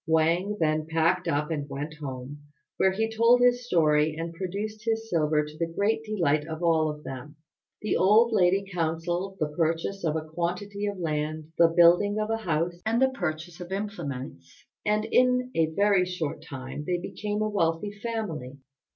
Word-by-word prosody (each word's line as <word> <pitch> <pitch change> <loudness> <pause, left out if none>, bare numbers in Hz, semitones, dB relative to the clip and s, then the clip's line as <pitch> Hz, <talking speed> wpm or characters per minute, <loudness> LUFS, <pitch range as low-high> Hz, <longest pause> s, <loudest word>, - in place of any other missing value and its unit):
Wang 170 +6 +2
then 155 -1 +1
packed 165 +3 +1
up 150 +3 0
and 145 -2 -3
went 145 +3 -5
home, 135 -1 -7 0.4
where 190 - +4
he 220 +4 0
told 230 +2 +5
his 245 0 +3
story 155 -4 +3
and 165 +1 -5
produced 205 +5 -5
his 225 0 -1
silver 150 -2 +2
to 150 +1 -11
the 165 - 0
great 210 +5 0
delight 170 -9 +1
of 160 +1 -5
all 160 -2 +3
of 150 0 -7
them. 135 +3 -8 0.5
The 215 - 0
old 215 +5 +5
lady 195 0 +3
counselled 175 +2 -2
the 155 - 0
purchase 165 +5 -1
of 160 -2 0
a 155 -1 -2
quantity 180 +5 -3
of 200 -1 -3
land, 155 -1 -3
the 170 - +8
building 175 +5 +5
of 215 +1 -1
a 225 - +1
house, 175 -3 -2
and 225 +2 +1
the 265 0 +4
purchase 175 -6 -4
of 175 +1 -8
implements; 140 - -6 0.2
and 210 +1 +1
in 250 +1 +2
a 165 -1 +2
very 195 +2 +2
short 160 -5 -4
time 140 -2 -7
they 180 - +1
became 210 +4 -3
a 215 - 0
wealthy 170 0 0
family. 200 - -5
170 Hz, 175 wpm, -27 LUFS, 155-205 Hz, 0.5 s, the